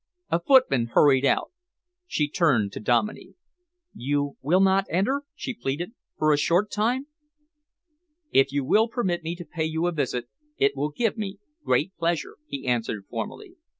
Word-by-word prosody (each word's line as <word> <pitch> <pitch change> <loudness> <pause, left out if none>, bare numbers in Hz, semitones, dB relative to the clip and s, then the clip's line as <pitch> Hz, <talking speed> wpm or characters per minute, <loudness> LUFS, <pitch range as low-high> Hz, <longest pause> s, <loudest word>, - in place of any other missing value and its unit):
A 165 - +3
footman 170 - +4
hurried 140 -2 +5
out. - - +1 0.6
She 150 - 0
turned 135 - +2
to - - -6
Dominey. 120 - 0 0.6
"You 145 +2 -1
will 170 +7 +3
not 195 0 +3
enter," 260 - 0
she 260 - -4
pleaded, 170 - -4 0.2
"for 155 0 +3
a 145 - +2
short 175 +7 +2
time?" 240 +6 0 1.3
"If 135 - +4
you 140 -1 -1
will 220 - +4
permit 195 -8 -1
me 165 +1 -4
to 175 -1 -9
pay 160 0 -3
you 160 +1 -1
a 175 - +1
visit, 125 -6 -2 0.3
it 415 0 +2
will 150 - -1
give 225 +9 -1
me 200 -2 -4 0.3
great 190 - +1
pleasure," 170 -1 -1
he 140 -1 -6
answered 115 -5 -1
formally. 360 - -6
165 Hz, 160 wpm, -25 LUFS, 140-205 Hz, 1.3 s, hurried